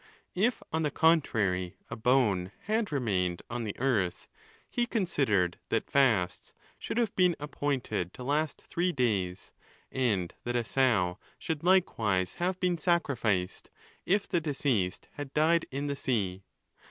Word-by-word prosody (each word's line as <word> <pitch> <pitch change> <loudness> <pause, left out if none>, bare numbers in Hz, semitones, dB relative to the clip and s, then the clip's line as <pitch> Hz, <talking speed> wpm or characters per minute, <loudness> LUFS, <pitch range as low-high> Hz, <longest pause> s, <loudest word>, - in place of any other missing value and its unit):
If, 220 +6 +1
on 160 - +1
the 150 - +1
contrary, 105 - +2 0.2
a - - -2
bone 110 -7 +2
had 215 -2 0
remained 95 - 0
on 120 -1 -3
the 105 - -5
earth, 110 -9 0 0.4
he 240 -1 -1
considered 135 - +1
that - - -1
fasts 115 -10 +2 0.3
should - - -4
have 230 -4 +1
been 180 -2 +4
appointed 135 - -2
to 125 - -8
last 145 +3 -1
three 180 +1 0
days, 100 - -1 0.4
and 105 -10 0
that 120 0 -2
a 120 -1 +1
sow 110 -9 +2 0.2
should 160 -2 -4
likewise 110 - +2
have 180 +1 0
been 180 -2 +1
sacrificed, 120 - 0 0.3
if 200 +2 +1
the 170 - 0
deceased 135 - -1
had 145 -2 -7
died 165 +2 +3
in 140 +2 -3
the 140 -1 -1
sea. 100 -8 -1
130 Hz, 140 wpm, -30 LUFS, 100-165 Hz, 0.4 s, been